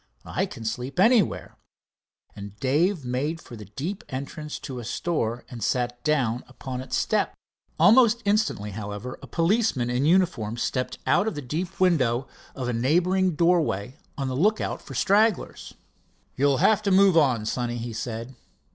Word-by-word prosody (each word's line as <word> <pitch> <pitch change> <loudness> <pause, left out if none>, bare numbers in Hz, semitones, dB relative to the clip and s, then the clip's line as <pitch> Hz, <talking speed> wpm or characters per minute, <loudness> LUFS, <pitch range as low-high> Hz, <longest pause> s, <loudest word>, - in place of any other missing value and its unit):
"I - - -1
can 115 - -9
sleep 125 +8 -4
anywhere," 220 -2 +3 0.8
and 100 0 -9
Dave 150 - +1
made 140 +7 -2
for 120 - -11
the 105 -2 -10
deep 145 - -5
entrance 145 +3 -5
to 130 -4 -7
a - - -7
store 120 -3 -2
and 120 -4 -7
sat 120 0 -1
down 130 -6 +1
upon 130 -2 -6
its 130 - -3
step. - - 0 0.4
Almost 235 0 +5
instantly, 200 - 0
however, 105 +4 -6
a - - -10
policeman 165 - +1
in 125 +4 +1
uniform 165 - +2
stepped 125 +1 -2
out 210 - +3
of 220 - -2
the 145 - -4
deep 155 +9 -2
shadow 135 -9 +2 0.3
of 130 -3 -4
a 125 - -1
neighboring 175 +9 +2
doorway, 155 - +1 0.2
on 135 -2 -2
the 130 - -2
lookout 210 +10 +1
for - - -10
stragglers. 210 +1 +1 0.6
"You'll 140 0 +2
have 215 +9 +4
to 205 - -1
move 190 -1 +5
on, 130 -9 +3
sonny," 120 +1 -2
he 120 0 -5
said. 115 +2 -5
135 Hz, 160 wpm, -25 LUFS, 120-180 Hz, 0.8 s, Almost